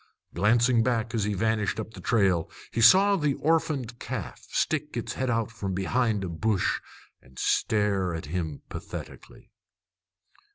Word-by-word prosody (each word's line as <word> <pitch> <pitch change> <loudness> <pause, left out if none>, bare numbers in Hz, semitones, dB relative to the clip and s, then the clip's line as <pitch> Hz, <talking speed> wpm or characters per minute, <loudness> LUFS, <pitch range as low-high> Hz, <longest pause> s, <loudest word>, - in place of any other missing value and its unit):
Glancing 115 +6 +3
back 115 -1 0
as 110 -3 0
he 105 -1 -1
vanished 110 +1 0
up 110 0 -5
the - - -10
trail, 95 -8 +2 0.2
he 115 - -1
saw 195 - +7
the 150 -6 0
orphaned 145 -7 0
calf 120 -8 -6
stick 150 -3 -1
its 120 - -3
head 130 -1 -2
out 115 -1 0
from 100 -4 -4
behind 105 +2 0
a - - -2
bush 95 +4 0 0.4
and 65 -1 -21
stare 100 - +1
after 80 -2 -7
him 80 -5 -3
pathetically. - - -9
110 Hz, 150 wpm, -27 LUFS, 95-125 Hz, 0.4 s, saw